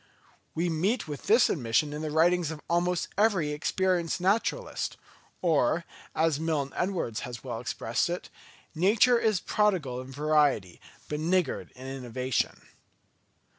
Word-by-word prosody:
We 170 +2 0
meet 180 +7 0
with 145 -2 -7
this 225 +2 +6
admission 135 +1 0
in 150 - -4
the 155 - -3
writings 170 +2 +3
of 160 -2 -6
almost 175 +1 +1
every 195 -9 +3
experienced 175 +3 0
naturalist; 215 - 0 0.5
or, 165 0 +2 0.3
as 160 -3 +2
Milne 155 -4 -1
Edwards 175 - -1
has 120 -2 -7
well 120 -4 -4
expressed 115 +3 -1
it, 175 +1 -5 0.4
"Nature 215 +8 +4
is 215 -5 +2
prodigal 175 -15 0
in 130 +1 -10
variety, 145 - +1 0.3
but 150 - -3
niggard 175 +3 0
in 130 +1 -10
innovation." 130 -1 -2
160 Hz, 130 wpm, -28 LUFS, 135-180 Hz, 0.5 s, this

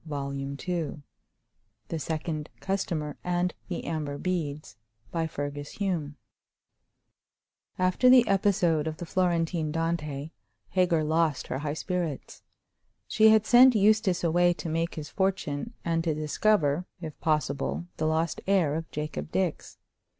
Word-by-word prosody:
Chapter 140 -2 -3
III 145 +3 -4 0.9
The 165 - -2
Second 155 -1 -3
Customer 170 -6 -2
And 180 0 0
The 175 - -4
Amber 150 -3 -3
Beads 150 - -3 0.4
AFTER 160 -3 -2 2.3
the 240 +7 +5
episode 180 -6 +2
of 155 0 -4
the 175 - -6
Florentine 170 -3 0
Dante, 160 -2 -2 0.4
Hagar 175 -4 +2
lost 155 -2 +1
her 130 - -2
high 145 0 -3
spirits. 170 -5 -4 0.7
She 220 0 +5
had 220 -1 +5
sent 250 +1 +7
Eustace 210 -3 +3
away 175 +1 +3
to 170 - -6
make 165 +1 -1
his 150 -2 -6
fortune, 190 +1 -2
and 165 -1 +1
to 160 -3 0
discover, 155 +1 +1
if 160 -3 -8
possible, 150 0 -1
the 155 - 0
lost 160 +1 0
heir 185 -7 +3
of 165 +1 -4
Jacob 150 +1 -5
Dix. 185 -4 -2
165 Hz, 120 wpm, -28 LUFS, 150-180 Hz, 2.3 s, sent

